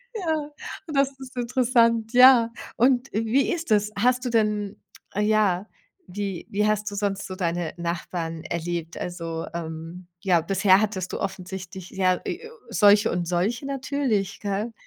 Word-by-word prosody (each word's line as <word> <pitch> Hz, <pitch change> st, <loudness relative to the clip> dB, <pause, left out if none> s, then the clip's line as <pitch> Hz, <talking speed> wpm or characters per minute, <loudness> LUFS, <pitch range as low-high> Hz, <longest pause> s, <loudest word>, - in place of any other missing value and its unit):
Ja 345 Hz, -7 st, 0 dB, 0.5 s
und 300 Hz, -3 st, -3 dB
das 275 Hz, 0 st, +3 dB
ist 260 Hz, -1 st, -11 dB
interessant, 235 Hz, -2 st, +2 dB
ja. 250 Hz, -2 st, +7 dB, 0.2 s
Und 250 Hz, +2 st, +3 dB
wie 225 Hz, +5 st, +1 dB
ist 335 Hz, -7 st, -5 dB
das? 210 Hz, 0 st, +3 dB
Hast 250 Hz, +4 st, +2 dB
du -, -, 0 dB
denn 210 Hz, -3 st, 0 dB, 0.4 s
ja, 210 Hz, -3 st, +2 dB, 0.4 s
wie 195 Hz, -1 st, -4 dB
wie 210 Hz, +1 st, +1 dB
hast 210 Hz, 0 st, 0 dB
du -, -, -6 dB
sonst 200 Hz, -1 st, -2 dB
so 185 Hz, -, -6 dB
deine 175 Hz, -3 st, -1 dB
Nachbarn 170 Hz, -1 st, -4 dB
erlebt? 170 Hz, -1 st, -4 dB
Also, 165 Hz, -2 st, -4 dB
ähm, 165 Hz, +1 st, -6 dB
ja, 180 Hz, -4 st, +3 dB
bisher 190 Hz, +3 st, +4 dB
hattest 195 Hz, -4 st, -2 dB
du -, -, -3 dB
offensichtlich, 190 Hz, -1 st, -6 dB
ja, 185 Hz, -1 st, +2 dB
e 460 Hz, -, -5 dB, 0.2 s
solche 205 Hz, 0 st, +5 dB
und 175 Hz, -1 st, -2 dB
solche 195 Hz, +9 st, 0 dB
natürlich, 265 Hz, -7 st, -1 dB
gell? 205 Hz, +3 st, -2 dB
205 Hz, 150 wpm, -25 LUFS, 180-235 Hz, 0.5 s, ja